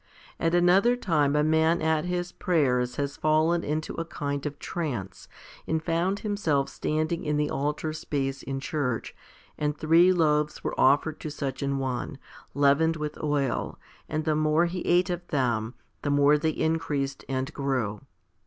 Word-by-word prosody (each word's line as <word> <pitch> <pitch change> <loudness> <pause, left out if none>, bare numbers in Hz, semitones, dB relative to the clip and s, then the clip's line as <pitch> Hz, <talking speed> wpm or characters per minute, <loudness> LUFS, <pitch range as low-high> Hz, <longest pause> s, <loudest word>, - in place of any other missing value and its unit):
At 165 +1 +1
another 185 +7 +4
time 150 -11 +1
a 150 - +3
man 160 +2 +3
at 160 0 +1
his 180 0 -2
prayers 125 -9 +1
has 140 0 -3
fallen 155 +2 +2
into 155 +1 -2
a 165 - -1
kind 145 -3 -3
of 145 0 -6
trance, 120 - -5 0.4
and 160 0 -1
found 175 +5 0
himself 170 -10 0
standing 155 +2 -2
in 150 -2 0
the 150 0 0
altar 150 +2 -2
space 135 -3 -3
in 135 0 -4
church, 135 -4 -3 0.4
and 150 0 -1
three 165 +4 +5
loaves 150 -4 +1
were - - -2
offered 145 +4 +3
to 155 - -5
such 135 -3 -4
an 140 0 0
one, 135 +2 -3 0.4
leavened 145 +3 +3
with 150 -1 -5
oil, 145 -4 -1 0.3
and 155 0 -2
the 155 -1 +2
more 155 +2 +3
he 175 +1 -3
ate 180 +1 +3
of 175 0 -4
them, 120 -5 -1 0.3
the 145 - -2
more 145 +1 +5
they 155 +2 +1
increased 150 -4 -1
and 130 0 -2
grew. 125 -7 -2
150 Hz, 160 wpm, -27 LUFS, 140-165 Hz, 0.4 s, three